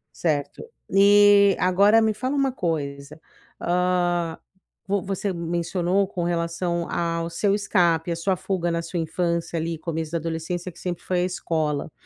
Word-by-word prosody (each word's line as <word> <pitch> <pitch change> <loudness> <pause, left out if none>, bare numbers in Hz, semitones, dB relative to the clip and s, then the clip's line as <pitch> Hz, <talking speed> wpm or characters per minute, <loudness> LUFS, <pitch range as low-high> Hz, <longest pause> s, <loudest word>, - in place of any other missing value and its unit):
Certo, 145 -4 -2 0.3
e 200 0 +6
agora 200 +5 +4
me 220 -1 +2
fala 255 +5 -3
uma 275 -1 +1
coisa, 150 - -4 0.4
hã, 175 -1 0 0.5
vo 200 0 0
você 195 0 -2
mencionou 175 +3 0
com 180 -2 -4
relação 170 0 -2
ao 170 0 -1
seu 195 +4 0
escape, 175 -5 +1
a - - 0
sua 185 +3 0
fuga 175 0 -2
na 170 0 -1
sua 165 +2 -5
infância 170 +1 -2
ali 165 +1 -3
começo 160 -1 -4
da 170 - 0
adolescência, 165 +2 -4
que 170 - -17
sempre 175 -1 -4
foi 180 -1 -1
à - - +1
escola, 155 -5 -2
175 Hz, 155 wpm, -24 LUFS, 165-190 Hz, 0.5 s, e